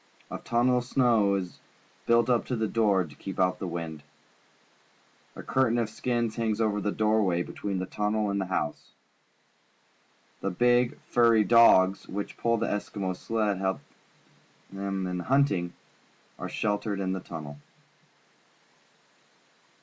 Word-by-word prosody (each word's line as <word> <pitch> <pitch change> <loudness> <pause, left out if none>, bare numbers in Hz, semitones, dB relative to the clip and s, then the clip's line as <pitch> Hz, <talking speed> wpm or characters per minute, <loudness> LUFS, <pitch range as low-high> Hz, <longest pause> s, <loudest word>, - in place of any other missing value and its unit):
A - - -4
tunnel 125 +1 +2
of - - -5
snow 115 -6 +3
is 90 -2 -5 0.5
built 115 -1 +4
up 120 -2 +2
to 125 - -1
the 110 -1 -1
door 105 -4 +2
to 75 -4 -12
keep 95 +5 -7
out 90 0 +2
the 95 - -4
wind. 85 -3 -5 1.3
A - - -8
curtain 130 -3 +1
of 115 -2 -1
skins 120 0 -2
hangs 110 -2 -1
over 105 -2 +1
the 105 - -1
doorway 105 -5 +1
between 100 +1 -4
the 95 - -2
tunnel 105 +1 -1
and 100 0 -1
the 95 - -3
house. 90 -5 -3 1.5
The 100 - -2
big, 120 +5 +2
furry 115 -2 +3
dogs, 100 -4 +5
which 100 +1 -5
pull 115 0 +1
the - - -1
Eskimo's 100 -2 -3
sled 110 -2 -1
and 95 -2 -2
help 95 0 0 0.9
him 95 -1 -3
in 90 0 -3
hunting, 100 -6 +1 0.7
are - - -5
.sheltered 105 -1 -2
in 95 -1 -1
the 95 - -3
tunnel. 75 -4 -8
105 Hz, 145 wpm, -27 LUFS, 95-115 Hz, 1.5 s, dogs